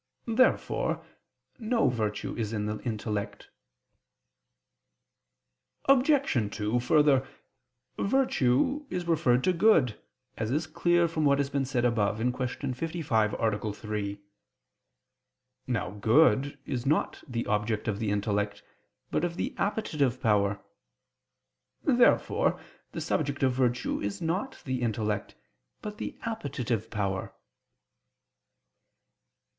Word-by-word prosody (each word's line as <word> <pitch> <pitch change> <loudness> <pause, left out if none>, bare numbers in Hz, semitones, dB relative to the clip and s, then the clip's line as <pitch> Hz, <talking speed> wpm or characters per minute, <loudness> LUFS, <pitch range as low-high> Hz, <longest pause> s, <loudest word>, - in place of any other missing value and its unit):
Therefore 235 +3 +1 0.5
no 230 0 +2
virtue 110 -4 -2
is 110 -2 -3
in 105 -1 -1
the 105 0 -3
intellect. 105 -3 -4 2.3
Obj. 275 +1 +4 0.2
2: 105 +3 0
Further, 140 0 +3 0.7
virtue 265 - +2
is 180 -1 -3
referred 130 -7 +3
to 185 - +3
good, 165 - +3 0.4
as 110 -1 -1
is 150 +6 0
clear 175 +2 +2
from 160 -1 -2
what 140 -1 +4
has 140 0 -1
been 140 -1 0
said 125 -2 0
above 110 -3 +1
(Q. 125 +3 -2
55, 130 -8 0
A. 110 -2 -1
3). 105 -2 -4 1.5
Now 115 -7 -1
good 135 +7 +3
is 120 -2 -3
not 155 - 0
the 120 -3 -3
object 105 +1 -1
of 105 -2 -1
the 110 - -1
intellect, 105 0 -1 0.5
but - - 0
of 175 -1 -1
the - - -3
appetitive 150 - 0
power. 100 -4 +2 1.2
Therefore 250 -5 +3 0.3
the - - -5
subject 140 -2 -1
of 130 -1 +3
virtue 125 -1 0
is 100 0 -3
not 185 +11 -3
the 130 -2 -2
intellect, 110 -3 -2 0.5
but 210 0 -6
the - - -5
appetitive 130 - -3
power. 100 -4 -3
125 Hz, 110 wpm, -28 LUFS, 105-165 Hz, 2.3 s, Obj